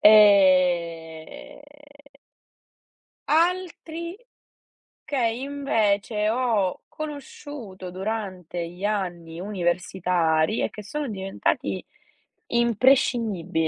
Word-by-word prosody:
Ehm 185 - +4 1.7
altri 340 +1 0 0.9
che 285 - -3
invece 225 -4 0
ho 225 -6 0
conosciuto 285 -9 -8
durante 185 -3 -4
gli 180 +3 -11
anni 175 -5 -2
universitari 180 -2 +1
e - - 0
che 210 - -9
sono 290 +7 -4
diventati 195 -2 -2 0.6
imprescindibili 230 -8 +2
205 Hz, 65 wpm, -25 LUFS, 180-250 Hz, 1.7 s, Ehm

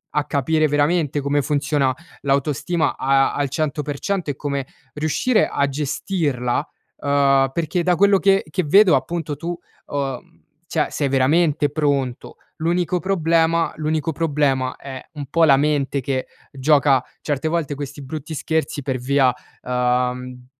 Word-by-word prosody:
a 150 -1 +1
capire 155 +3 +1
veramente 145 0 +1
come 140 +1 +1
funziona 145 -2 0 0.3
l'autostima 145 +4 0
a 135 0 +2
al 145 -1 -1
100% 150 +5 -2
e - - -7
come 140 -1 -3 0.3
riuscire 160 +10 +1
a 140 - 0
gestirla. 140 -3 -1 0.3
Uhm, 140 -1 +3
perché 170 +2 -1
da 180 0 +3
quello 200 +2 +4
che 195 0 +3
che 185 +4 -1
vedo, 190 +4 +6
appunto 165 -3 -2
tu, 170 +3 -4 0.3
uhm, 140 +4 -5 0.3
cioè 155 -2 0
sei 145 - -1
veramente 145 +3 +2
pronto, 140 -5 -1 0.2
l'unico 175 +2 0
problema 165 -2 +1
l'unico 155 +1 -1
problema 140 -5 0
è 130 -2 -8
un 145 -2 -6
po' 165 +5 +2
la 140 -3 +6
mente 145 -1 0
che 130 0 -2 0.2
gioca 140 -1 +3 0.2
certe 145 0 -2
volte 155 -3 -1
questi 145 0 -7
brutti 155 +3 -6
scherzi 160 -1 -2
per 130 -1 -2
via, 130 0 +2 0.3
uhm, 125 0 -1
145 Hz, 135 wpm, -21 LUFS, 135-160 Hz, 0.3 s, vedo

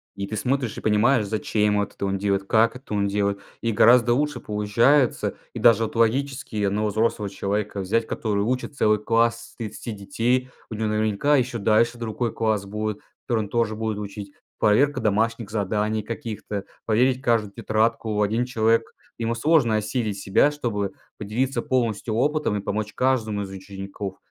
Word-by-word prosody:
и 100 -1 -4
ты 110 - -4
смотришь 125 +1 -1
и - - -6
понимаешь 110 +2 +3
зачем 105 0 0
вот 100 -1 -1
это 100 - -3
он 95 0 0
делает, 100 0 0
как 115 +3 +3
это 125 -4 -8
он 100 -1 +1
делает, 100 0 0 0.2
и 115 - 0
гораздо 120 +2 +5
лучше 150 +3 0
получается 115 +6 +2 0.2
и - - -5
даже 115 -1 +5
вот 110 - -4
логически 125 -1 0
одного 105 +2 +1
взрослого 105 -1 0
человека 100 +1 -2
взять 110 +4 0
который 100 -3 -1
учит 125 +5 -2
целый 105 -5 +3
класс 115 +1 0
из - - -26 0.2
30 115 - -5
детей, 120 +5 -1 0.2
у 110 - -5
него 110 0 -1
наверняка 110 +7 +2
еще 125 -2 -1
дальше 115 +3 +2
другой 115 0 -3
класс 110 -3 0
будет, 105 +1 -3 0.3
который 115 -3 +1
он - - -11
тоже 115 -2 0
будет 110 -1 -2
учить. 100 -1 -7 0.3
Проверка 140 +8 +3
домашних 110 +1 0
заданий 105 +1 -1
каких-то, 110 -3 -5 0.2
проверить 125 +4 +2
каждую 115 -5 +1
тетрадку, 110 +1 0
в 105 - 0
один 110 +4 +1
человек 115 -2 +1 0.2
ему 115 0 -1
сложно 120 -3 +3
осилить 105 -1 -2
себя, 100 +9 +3
чтобы 105 -9 -3 0.2
поделиться 120 +6 -1
полностью 115 -3 -1
опытом 145 -1 +1
и - - -3
помочь 105 +1 -3
каждому 115 -6 0
из 100 - -5
учеников. 95 0 -7
110 Hz, 170 wpm, -24 LUFS, 105-120 Hz, 0.3 s, гораздо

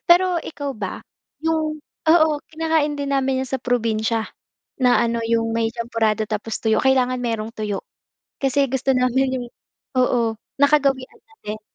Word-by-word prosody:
Pero 360 +1 +5
ikaw 285 -4 -5
ba, 200 -3 -4 0.4
'yong 315 -1 -1 0.3
oo, 315 0 +6 0.2
kinakain 315 -2 +1
din 280 0 -2
namin 265 -1 +1
'yan 260 - -4
sa 265 - -1
probinsya 225 -2 0 0.5
na 250 -1 +5
ano, 230 0 -1
'yong 225 0 0
may 225 0 +1
champorado 225 -2 0
tapos 215 +1 -3
tuyo. 220 -1 +1
Kailangan 255 -1 +2
mayroong 225 -2 -2
tuyo 210 -3 -4 0.6
kasi 275 +1 +3
gusto 265 +1 0
namin 260 +1 +2
'yong 245 - -6 0.5
oo, 240 -3 +2 0.2
nakagawian 280 -2 +2
na 445 - -26
din 215 +1 -3
255 Hz, 150 wpm, -22 LUFS, 225-280 Hz, 0.6 s, oo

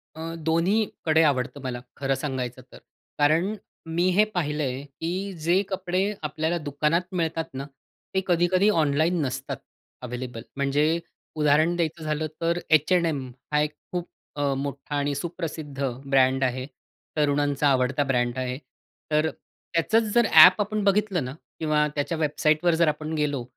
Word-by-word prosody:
अ, 165 +1 -5
दोन्हीकडे 165 -1 +2
आवडतं 140 -1 0
मला 120 -2 -4 0.2
खरं 135 -1 0
सांगायचं 130 -2 -4
तर. - - -12 0.4
कारण 165 +8 +2 0.3
मी 165 +2 0
हे 200 +4 +5
पाहिलंय, 150 -5 -1
की 175 +8 -4
जे 175 +4 +3
कपडे 185 -1 -1 0.2
आपल्याला 160 +3 -1
दुकानात 150 +2 0
मिळतात 165 -2 -1
ना? 135 +1 -5 0.5
ते 190 - +2
कधी-कधी 180 +3 +3
ऑनलाईन 160 -1 +2
नसतात 130 - -4 0.4
अव्हेलेबल. 125 -1 -6 0.2
म्हणजे 145 +4 +2 0.4
उदाहरण 155 +3 +3
द्यायचं 165 -1 -2
झालं 155 0 -1
तर 170 +1 +1
H&M 155 -4 +2 0.2
हा 150 - +3
एक 150 0 -1 0.2
खूप 175 -1 -3 0.3
अ, 145 -1 0
मोठा 140 +1 -4
आणि 145 0 0
सुप्रसिद्ध 155 -3 -5 0.2
ब्रँड 135 -1 +3
आहे. 130 0 -1 0.5
तरुणांचा 145 -1 +2
आवडता 130 +1 +2
ब्रँड 125 -2 0
आहे. 125 0 -2 0.5
तर 155 +1 +3
अ, - - -2 0.4
त्याचंच 220 +7 +3
जर 240 -1 +5
ॲप 180 +6 +9
आपण 210 +1 -1
बघितलं 200 -4 +2
ना 130 - -5 0.3
किंवा 150 -1 +2
त्याच्या 150 +3 -1
वेबसाईटवर 155 +2 +2
जर 170 0 +3
आपण 155 +1 -2
गेलो, 145 -5 -1
155 Hz, 145 wpm, -25 LUFS, 140-170 Hz, 0.5 s, ॲप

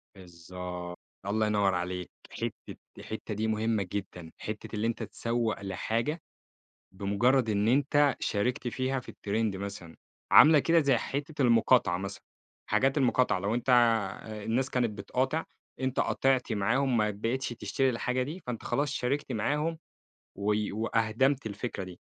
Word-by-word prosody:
بالضبط، 90 0 -8 0.3
الله 110 +2 +1
ينور 100 -2 +2
عليك. 90 0 -3 0.2
حتّة - - -6 0.2
الحتّة 110 0 -6
دي 110 +2 -1
مهمة 110 -1 0
جدًا، 90 -5 -5
حتّة 105 0 -6
اللي 105 +2 0
أنتَ 115 - -2
تسوّق 115 -3 -2
لحاجة 115 - -2 0.7
بمجرد 110 +6 +2
إن 105 +1 +1
أنتَ 145 +2 +3
شاركت 125 +6 -1
فيها 130 +2 -1
في - - -11
الtrend 105 0 -1
مثلًا، 95 -4 -7 0.3
عاملة 155 0 +9
كده 165 +3 +4
زي 140 -4 +3
حتّة 145 +4 -3
المقاطعة 115 -6 +4
مثلًا. 100 +1 -6 0.4
حاجات 135 +2 +2
المقاطعة 125 -5 +2
لو 100 +4 -1
أنتَ 120 +2 -1 0.7
الناس 130 +4 0
كانت 120 -3 +1
بتقاطع، 130 +10 -1 0.4
أنتَ 130 0 0
قاطعت 130 -3 +1
معاهم، 125 +6 +1
ما 105 -1 +2
بقيتش 115 +6 -2
تشتري 130 +3 0
الحاجة 125 +1 -1
دي، 155 +8 -5
فأنتَ 120 -3 -4
خلاص 145 0 0
شاركت 140 +1 -1
معاهم، 150 +9 -1 0.6
و 100 +2 0 0.2
و 110 +3 -2
أهدَمت 115 +5 +1
الفكرة 110 -1 -4
دي، 90 -1 -11
115 Hz, 140 wpm, -29 LUFS, 100-130 Hz, 0.7 s, عاملة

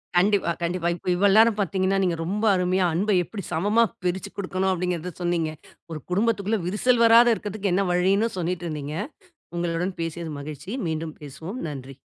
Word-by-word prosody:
கண்டிப்பா, 195 0 +3
கண்டிப்பா. 170 0 0
இப்ப, 175 - -14
இவ்வளவு 195 +2 +4
நேரம் 225 -1 +5
பாத்தீங்கன்னா, 190 +1 +1
நீங்க 180 -2 +1
ரொம்ப 210 +5 -1
அருமையா, 180 0 +1
"அன்ப 205 +5 +1
எப்படி 200 +2 -7
சமமா 205 +8 +3 0.2
பிரிச்சு 180 0 -2
குடுக்கணும்?" 190 -1 -1
அப்படிங்குறத 180 -1 -2
சொன்னீங்க. 170 -2 0 0.4
ஒரு 155 - -4
குடும்பத்துக்குள்ள 210 +1 +1
விரிசல் 230 +6 +2
வராத 230 0 +7
இருக்கத்துக்கு 205 -2 -3
என்ன 195 +1 +2
வழின்னும் 195 +5 +2
சொல்லீட்டிருந்தீங்க. 165 -4 -3 0.6
உங்களுடன் 175 +2 -1
பேசியது 165 0 -4
மகிழ்ச்சி. 150 +5 -8 0.2
மீண்டும் 160 0 -3
பேசுவோம். 160 - -7
நன்றி. 135 -2 -8
180 Hz, 150 wpm, -24 LUFS, 165-205 Hz, 0.6 s, வராத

